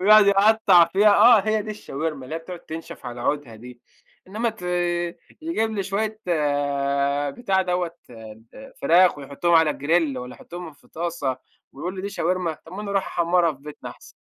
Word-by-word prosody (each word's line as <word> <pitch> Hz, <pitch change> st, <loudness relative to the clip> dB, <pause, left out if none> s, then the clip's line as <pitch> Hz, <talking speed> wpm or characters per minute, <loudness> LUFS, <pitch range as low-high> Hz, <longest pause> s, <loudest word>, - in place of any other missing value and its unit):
ويقعد 210 Hz, +2 st, +7 dB
يقطّع 200 Hz, -3 st, +5 dB
فيها 205 Hz, +4 st, +3 dB
آه 235 Hz, -4 st, +7 dB
هي 215 Hz, +1 st, 0 dB
دي 215 Hz, -, -7 dB
الشاورما، 155 Hz, -8 st, -5 dB
اللي 145 Hz, +5 st, -7 dB
هي -, -, -2 dB
بتقعد 175 Hz, +1 st, -9 dB
تنشف 160 Hz, -5 st, -9 dB
على 120 Hz, 0 st, -7 dB
عودها 135 Hz, -4 st, -2 dB
دي. 125 Hz, +2 st, -13 dB, 0.5 s
إنّما 225 Hz, +4 st, -1 dB
ت 220 Hz, -4 st, -15 dB, 0.8 s
يجيب 225 Hz, -10 st, -1 dB
لي 205 Hz, -3 st, -2 dB
شوية 215 Hz, +3 st, -3 dB, 1.1 s
بتاع 190 Hz, -, 0 dB
دوّة 180 Hz, -2 st, -2 dB, 0.2 s
ال 115 Hz, -, -13 dB
فراخ 175 Hz, -2 st, +5 dB
ويحطّهم 145 Hz, +5 st, -1 dB
على 160 Hz, -2 st, +5 dB
grill 155 Hz, -1 st, 0 dB
والّا 125 Hz, 0 st, -7 dB
يحطّهم 175 Hz, -2 st, -9 dB
في 140 Hz, -, -25 dB
طاسة، 160 Hz, -6 st, -3 dB, 0.4 s
ويقول 175 Hz, +7 st, -5 dB
لي: 185 Hz, -, -5 dB
"دي 200 Hz, -, -3 dB
شاورما" 180 Hz, -4 st, -2 dB
طَب 165 Hz, -, -14 dB
ما 205 Hz, +3 st, -6 dB
أنا 200 Hz, -, -5 dB
اروح 195 Hz, -1 st, 0 dB
أحمّرها 170 Hz, -1 st, +1 dB
في 135 Hz, -, -16 dB
بيتنا 150 Hz, 0 st, -9 dB
أحسن -, -, -16 dB
175 Hz, 175 wpm, -23 LUFS, 150-200 Hz, 1.1 s, ويقعد